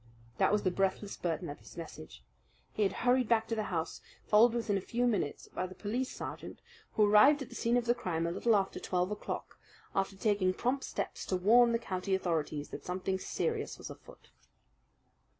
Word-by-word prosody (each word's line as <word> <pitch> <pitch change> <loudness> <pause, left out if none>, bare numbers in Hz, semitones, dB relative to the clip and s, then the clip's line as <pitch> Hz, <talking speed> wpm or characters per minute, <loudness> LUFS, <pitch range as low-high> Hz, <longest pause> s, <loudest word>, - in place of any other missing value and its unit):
That - - +4
was 210 0 +2
the 185 - +2
breathless 195 +2 -1
burden 165 -3 -2
of 145 - -7
his - - -15
message. 80 - -9 0.5
He - - -3
had 200 - +3
hurried 250 -1 +3
back 225 -1 +3
to 230 - 0
the 215 -1 -1
house, 165 -4 -3 0.2
followed 225 +3 +5
within 225 -3 0
a 195 - 0
few 240 +5 -1
minutes 200 -11 -1
by 185 - -3
the 185 - -11
police 240 +5 -2
sergeant, - - -7 0.3
who 215 - +4
arrived 240 +8 +6
at 250 - -12
the - - -11
scene 235 +1 +2
of 245 - 0
the 240 - +4
crime 170 -9 -2
a 170 - -1
little 230 +5 +2
after 195 -1 0
twelve 180 +1 -1
o'clock, 210 - -5 0.3
after 195 0 0
taking 190 -2 +1
prompt 265 +3 0
steps - - -4
to 185 - 0
warn 235 +6 +5
the 230 - +3
county 190 -3 -2
authorities 160 -5 -2
that - - -7
something 190 +1 -2
serious 450 - -2
was - - -8
afoot. - - -15
205 Hz, 200 wpm, -32 LUFS, 185-235 Hz, 0.5 s, arrived